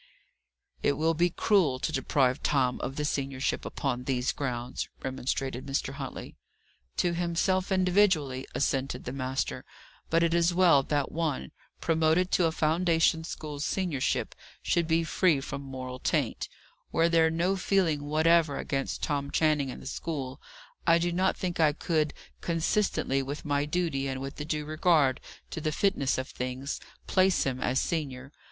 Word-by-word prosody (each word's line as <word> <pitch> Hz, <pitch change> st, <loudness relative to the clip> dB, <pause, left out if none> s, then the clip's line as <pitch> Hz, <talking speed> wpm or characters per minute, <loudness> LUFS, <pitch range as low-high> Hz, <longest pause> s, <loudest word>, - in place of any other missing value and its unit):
"It 145 Hz, -, +3 dB
will 160 Hz, +3 st, +1 dB
be 175 Hz, +2 st, +2 dB
cruel 175 Hz, -, +2 dB
to -, -, -2 dB
deprive 135 Hz, -1 st, +1 dB
Tom 130 Hz, -3 st, +1 dB
of 135 Hz, -, -4 dB
the 150 Hz, -, -2 dB
seniorship 135 Hz, -2 st, -1 dB
upon 125 Hz, -2 st, -2 dB
these 125 Hz, -1 st, 0 dB
grounds," 125 Hz, -3 st, -3 dB
remonstrated 130 Hz, 0 st, -3 dB
Mr. 135 Hz, 0 st, -1 dB
Huntley. 135 Hz, -2 st, -7 dB, 0.6 s
"To 175 Hz, -1 st, +2 dB
himself 175 Hz, +3 st, 0 dB
individually," 180 Hz, -8 st, +2 dB
assented 135 Hz, -2 st, -1 dB
the 125 Hz, -, -5 dB
master. 130 Hz, 0 st, -2 dB, 0.5 s
"But 165 Hz, +1 st, +3 dB
it 170 Hz, 0 st, +2 dB
is 170 Hz, 0 st, +3 dB
well 175 Hz, -6 st, +6 dB
that 145 Hz, 0 st, -1 dB
one, 155 Hz, -, -2 dB, 0.3 s
promoted 165 Hz, +3 st, +2 dB
to 180 Hz, -, +3 dB
a 165 Hz, -, +2 dB
foundation 165 Hz, 0 st, +2 dB
school's 150 Hz, -3 st, -5 dB
seniorship, 165 Hz, -7 st, -1 dB, 0.3 s
should 170 Hz, -2 st, +1 dB
be 165 Hz, 0 st, +2 dB
free 165 Hz, -1 st, +2 dB
from 140 Hz, +1 st, -5 dB
moral 130 Hz, -2 st, -6 dB
taint. -, -, -1 dB, 0.4 s
Were 165 Hz, +1 st, +3 dB
there 165 Hz, -1 st, +4 dB
no 170 Hz, +4 st, +1 dB
feeling 180 Hz, -6 st, +1 dB
whatever 155 Hz, 0 st, +3 dB
against 135 Hz, -1 st, -3 dB
Tom 140 Hz, -2 st, -1 dB
Channing 150 Hz, -4 st, +2 dB
in -, -, -7 dB
the -, -, -12 dB
school, 140 Hz, -3 st, -4 dB, 0.5 s
I 165 Hz, 0 st, +6 dB
do 175 Hz, +1 st, 0 dB
not 185 Hz, +2 st, +1 dB
think 180 Hz, -2 st, -3 dB
I 155 Hz, -2 st, +4 dB
could, 155 Hz, -1 st, 0 dB, 0.3 s
consistently 165 Hz, -4 st, +1 dB
with 140 Hz, +3 st, -6 dB
my 145 Hz, 0 st, +1 dB
duty 150 Hz, -4 st, -1 dB
and 130 Hz, -1 st, -3 dB
with 135 Hz, +2 st, -6 dB
a -, -, -3 dB
due 150 Hz, -1 st, -2 dB
regard 155 Hz, -3 st, +2 dB, 0.3 s
to 160 Hz, -, -4 dB
the 155 Hz, -, 0 dB
fitness 155 Hz, -5 st, +1 dB
of 130 Hz, 0 st, -3 dB
things, 130 Hz, +3 st, -4 dB, 0.3 s
place 190 Hz, 0 st, +3 dB
him 130 Hz, -1 st, -2 dB
as 130 Hz, +2 st, +1 dB
senior. 135 Hz, -5 st, -3 dB
150 Hz, 160 wpm, -29 LUFS, 135-170 Hz, 0.6 s, well